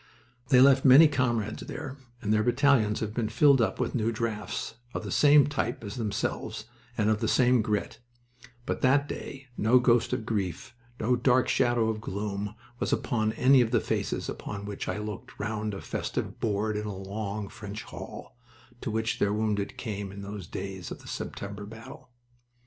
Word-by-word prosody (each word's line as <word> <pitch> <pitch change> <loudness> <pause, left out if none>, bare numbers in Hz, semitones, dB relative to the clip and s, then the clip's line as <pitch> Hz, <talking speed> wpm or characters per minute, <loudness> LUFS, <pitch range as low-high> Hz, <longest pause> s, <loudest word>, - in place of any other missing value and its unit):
They 125 -1 +7
left 135 0 +6
many 140 +5 +9
comrades 120 -6 -1
there, 145 -3 -6 0.3
and 105 0 +1
their 110 - +3
battalions 120 -2 +3
have 105 -1 -3
been 115 -2 -1
filled 135 +3 +5
up 110 -4 0
with - - -1
new 115 -2 +1
drafts 110 -2 -3 0.2
of - - -3
the - - -5
same 145 -1 +6
type 140 -5 -2
as 100 -2 -5
themselves 105 -1 -3 0.3
and 105 -2 +2
of 110 -1 +2
the 110 - 0
same 125 0 +4
grit 105 0 -2 0.7
but - - -2
that 140 +2 +4
day 135 -1 -7
no 115 +4 +4
ghost 120 -2 +3
of 110 - -2
grief, 100 -2 -3 0.3
no 125 +3 +2
dark 125 +1 +3
shadow 120 -2 +2
of 110 -1 -2
gloom, 105 0 -4 0.2
was - - -1
upon 110 -2 0
any 130 0 +5
of 115 - +1
the 120 -1 +3
faces - - -2
upon 100 0 -6
which 100 -1 -5
I - - -2
looked 105 -1 -7
round 105 0 -2
a - - -7
festive - - -4
board 105 0 0
in 105 0 -3
a 100 -2 -5
long, 100 +1 -4
French 105 +1 -8
hall, - - -9 0.5
to 130 - -3
which 110 +1 -1
their 100 - +2
wounded 105 -2 -1
came 100 -5 -4
in 100 +1 -8
those 100 -3 -7
days 95 -2 -6
of - - -8
the - - -13
September 100 0 -6
battle. 115 +3 -11
110 Hz, 185 wpm, -28 LUFS, 105-125 Hz, 0.7 s, many